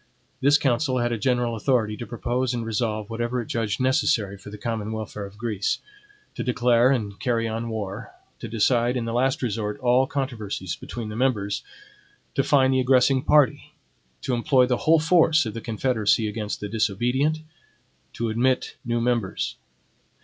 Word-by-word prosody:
This 140 +2 +5
council 130 0 +1
had 120 -1 0
a 115 - -1
general 120 0 +1
authority 110 -2 +1
to 120 - -7
propose 125 +1 -1
and 115 -1 -3
resolve 110 -1 -2
whatever 120 +2 -2
it 120 - -3
judged 110 -1 -2
necessary 115 -6 +1
for 100 - -12
the 105 - -8
common 110 -1 -3
welfare 105 -2 -5
of 100 +1 -16
Greece; 105 -3 -1 0.6
to - - -4
declare 125 0 +3
and 105 -7 -1
carry 115 -2 0
on 115 +1 -3
war; 105 0 -5 0.3
to - - -6
decide, 120 +3 +2
in 120 - -2
the 115 - -3
last 135 +4 +1
resort, 105 -3 -2
all 125 +1 +3
controversies 110 - -3
between 115 -3 -7
the 105 - -6
members; 110 -5 0 0.7
to - - +2
fine 135 -2 +4
the 130 - +2
aggressing 130 +1 +4
party; 150 -1 +2 0.5
to 130 - -1
employ 125 +2 +3
the 125 -1 0
whole 165 - +7
force 160 -2 +4
of 110 - -4
the 115 - -6
confederacy 110 -1 +1
against 105 0 -4
the 105 - -3
disobedient; 120 +9 0 0.7
to 115 -1 -2
admit 125 +4 0
new 120 0 -1
members. 115 -5 -1
120 Hz, 170 wpm, -24 LUFS, 110-130 Hz, 0.7 s, whole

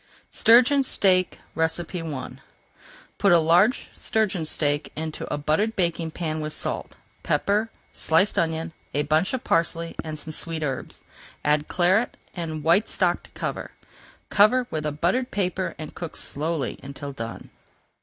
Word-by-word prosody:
STURGEON 250 +5 +6
STEAK 185 -8 +2 0.2
I 160 -3 -2 0.9
Put 200 - +4
a 175 - +8
large 175 - +3
sturgeon 205 -7 0
steak 145 -1 +1
into 155 0 -5
a - - 0
buttered 160 +10 +1
baking 170 -2 0
pan 155 -1 -3
with 155 0 -3
salt, - - -3 0.2
pepper, 210 +3 +1 0.2
sliced 165 +6 +2
onion, 160 0 -1 0.2
a 145 - +2
bunch 155 +4 +2
of 255 - -5
parsley, 165 -2 0
and 155 -1 -5
some 155 +1 -8
sweet 160 0 -3
herbs. 135 -3 -4 0.4
Add 150 0 +2
Claret 190 +6 +2 0.2
and 160 -4 -4
white 175 +7 +4
stock - - +1
to - - -18
cover. - - -4 0.6
Cover 230 +5 +5
with 155 -1 -2
a - - -1
buttered 180 - 0
paper 185 -1 -1
and 155 -1 -7
cook 170 -2 -7
slowly 150 -2 -2
until 140 +1 -7
done. 115 -3 -7
165 Hz, 145 wpm, -25 LUFS, 155-190 Hz, 0.9 s, a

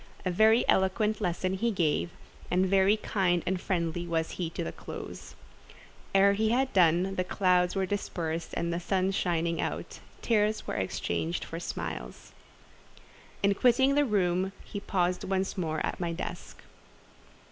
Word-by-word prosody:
A 185 - +1
very 220 +5 +4
eloquent 210 +3 +2
lesson 185 0 -1
he 230 +5 0
gave, 175 -5 0 0.4
and 185 +1 +2
very 195 +2 +4
kind 180 -5 0
and 185 0 -1
friendly 175 -2 -2
was 165 -1 -1
he 175 -3 -3
to - - -4
the 80 - -4
close. - - -9 0.8
Ere 200 +1 +6
he 215 +2 +1
had 260 +3 +1
done, 180 +1 +4
the 185 - +2
clouds 180 -1 +2
were 190 -1 +1
dispersed 170 -4 -3
and 170 0 -1
the 170 - -1
sun 190 +1 0
shining 170 -3 0
out—tears 215 -1 -2
were - - -4
exchanged 170 +2 -2
for 165 - -6
smiles. 60 - -6 1.1
In 200 0 +4
quitting 255 +5 +4
the 290 +1 +4
room 190 -5 +1
he 205 - -6
paused 180 -3 0
once 190 0 -1
more 160 -4 -1
at - - -4
my 170 -2 -2
desk. - - -7
185 Hz, 150 wpm, -29 LUFS, 170-200 Hz, 1.1 s, Ere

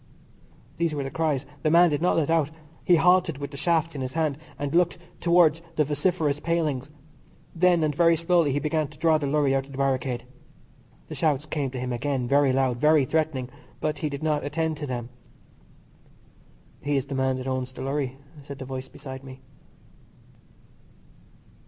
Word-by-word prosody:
These 165 -2 0
were 145 - -2
the 135 - -5
cries. 150 -4 0 0.2
The 155 - +2
man 170 +1 +6
did 145 +1 -1
not 180 - +2
let 160 -1 +1
out. 160 -3 +2 0.3
He 180 - +5
halted 175 -2 +3
with 140 0 -6
the - - -9
shafts 165 +2 +1
in 140 - -5
his 130 0 -4
hand, 155 -3 0 0.2
and 145 -1 -3
looked 175 +1 +3 0.2
towards 170 -2 +4
the 155 - +3
vociferous 150 0 0
pailings. 150 -5 -1 0.7
Then, 175 -1 +4
and 150 -1 +1
very 165 +2 +4
slowly, 170 -2 +2
he 135 - 0
began 155 0 0
to 145 +1 -16
draw 160 -1 +3
the 145 - -2
lorry 140 -1 +2
out 135 0 0
of 140 - -12
the - - -8
barricade. 130 -2 0 0.8
The - - -7
shouts 150 -3 0
came 145 -3 -2
to 130 0 -6
him 125 0 -3
again, 130 0 -1
very 140 +1 +4
loud, 130 -2 +1
very 150 0 +4
threatening, 150 -4 -1 0.3
but 150 -1 -2
he 150 - -1
did 140 +1 -6
not 150 -2 +1
attend 160 +2 -1
to 145 - -5
them. 120 -2 -4 1.7
"He 145 -1 0
is 135 - -1
the 140 - -6
man 130 -1 +1
that 130 - -6
owns 130 -1 -2
the 130 - -8
lorry," 135 -1 -2 0.2
said 140 -1 -9
a 130 - -6
voice 130 0 -6
beside 130 -1 -9
me. 130 -1 -11
145 Hz, 190 wpm, -26 LUFS, 135-160 Hz, 1.7 s, man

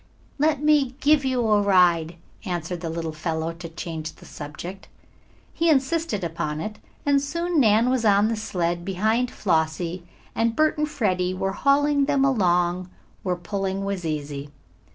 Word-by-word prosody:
"Let 300 -1 +2
me 290 -4 +3
give 295 0 +4
you 255 -3 0
a 210 -1 +4
ride," 175 -4 +3 0.3
answered 175 -3 -4
the 165 - -3
little 165 0 -3
fellow, 160 +1 -3
to 165 0 -9
change 160 -1 -5
the - - -17
subject. 170 +6 -8 0.7
He 335 0 +1
insisted 285 - +1
upon 165 -2 -3
it, 215 +5 -5 0.3
and 280 -1 +3
soon 335 +3 -1
Nan 225 -1 +4
was 255 -3 +1
on 205 -1 +4
the 230 - 0
sled 175 -5 -2
behind 220 +6 0
Flossie, 165 -1 -1 0.3
and 230 0 0
Bert 310 0 +3
and 305 0 0
Freddie 185 -8 0
were 195 +1 -1
hauling 285 +3 +3
them 280 -1 +2
along 180 -7 +1 0.3
where 180 -2 -1
pulling 195 +2 -3
was 200 -2 -3
easy. 145 -2 -4
195 Hz, 155 wpm, -24 LUFS, 170-260 Hz, 0.7 s, give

